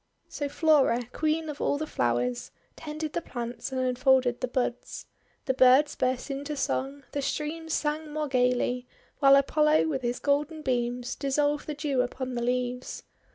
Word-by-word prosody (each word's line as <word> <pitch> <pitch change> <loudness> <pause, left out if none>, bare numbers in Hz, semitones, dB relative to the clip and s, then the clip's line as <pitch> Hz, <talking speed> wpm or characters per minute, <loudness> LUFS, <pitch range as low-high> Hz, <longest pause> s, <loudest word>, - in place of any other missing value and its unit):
So 285 -1 -4
Flora, 280 -6 +3
Queen 315 +1 0
of 295 -1 -6
all 285 - +1
the 310 - -3
Flowers, 120 - -1 0.3
tended 310 0 -5
the 340 - -1
plants 240 -3 -6
and 260 - -2
unfolded 255 -1 +2
the 255 - 0
buds. 250 -1 -3 0.4
The 265 - +1
birds 260 +3 +5
burst 255 +2 -1
into 285 +2 -4
song, 275 +1 -2
the 285 - -2
streams 320 +3 -2
sang 305 0 -2
more 305 0 -2
gayly, 250 -1 +1 0.3
while 275 -1 +7
Apollo 300 +3 +3
with 270 -4 -2
his 240 0 -1
golden 295 +2 0
beams 245 -1 -1
dissolved 290 +1 0
the 300 - -3
Dew 280 -3 0
upon 255 +1 -4
the 240 - -2
leaves. 250 +1 -2
275 Hz, 160 wpm, -27 LUFS, 250-300 Hz, 0.4 s, while